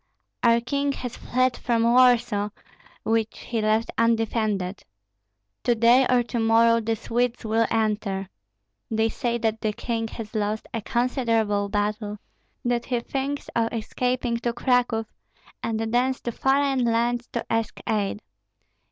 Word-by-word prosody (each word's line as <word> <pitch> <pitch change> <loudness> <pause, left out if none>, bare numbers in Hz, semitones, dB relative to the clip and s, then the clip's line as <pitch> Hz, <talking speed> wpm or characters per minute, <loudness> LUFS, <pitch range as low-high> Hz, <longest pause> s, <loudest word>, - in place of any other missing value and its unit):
Our 235 0 +4
king 280 +3 -1
has 250 -3 -6
fled 255 0 0
from 235 -2 0
Warsaw, 235 -4 +4 0.5
which 225 -1 0
he 230 -2 -3
left 215 +1 +1
undefended. 220 -4 0 0.8
To 240 - +3
day 235 +3 +5
or 250 -1 +4
to 240 0 -3
morrow 230 +1 +4
the 225 +1 0
Swedes 240 +2 -1
will 225 +1 +2
enter. 210 -3 -1 0.6
They 225 -1 +1
say 235 +1 -1
that 225 -1 -1
the 215 -1 0
king 225 +1 -2
has 225 -1 -8
lost 215 0 -1
a 225 - -2
considerable 230 -4 0
battle, 210 +1 -2 0.5
that 240 -1 0
he 245 -2 0
thinks 275 +3 -3
of 230 -1 +1
escaping 245 +1 -1
to 235 0 -2
Cracow, 240 -2 +1 0.6
and 220 -1 -2
thence 245 +4 +1
to 240 - -3
foreign 270 +1 +2
lands 235 +1 +1
to 235 - -2
ask 225 -1 -1
aid. 210 -1 -1
230 Hz, 140 wpm, -25 LUFS, 220-245 Hz, 0.8 s, day